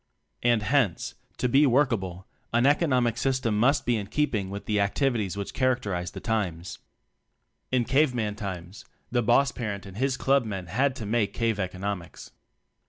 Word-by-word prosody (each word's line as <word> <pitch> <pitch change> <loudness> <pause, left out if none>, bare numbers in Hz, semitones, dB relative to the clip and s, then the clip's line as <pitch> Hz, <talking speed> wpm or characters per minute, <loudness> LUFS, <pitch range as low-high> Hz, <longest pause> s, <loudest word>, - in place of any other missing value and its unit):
And, 120 -3 +3
hence, 125 - +1 0.2
to 125 - +1
be 140 +4 +5
workable 110 -9 +1 0.3
an 120 +2 +3
"economic 130 -6 +3
system" 130 -5 0
must 140 +4 +3
be 120 -1 +2
in 100 -2 -4
keeping 110 -7 0
with 100 +1 -6
the 105 -1 +1
activities 105 -1 0
which 100 - -4
characterize 105 -9 0
the - - -8
times. 95 -7 -2 0.9
In 125 -2 +2
cave 135 +1 +3
man 105 -3 -1
times, 95 -2 -7 0.3
the 120 -1 +2
boss 120 +4 +3
parent 105 -4 -5
and 95 0 -10
his 130 +1 0
club 135 0 +3
men 95 -5 -5
had 130 +10 0
to 115 - -6
make 105 -1 0
cave 115 -3 0
economics. 95 -1 -5
115 Hz, 165 wpm, -27 LUFS, 100-130 Hz, 0.9 s, be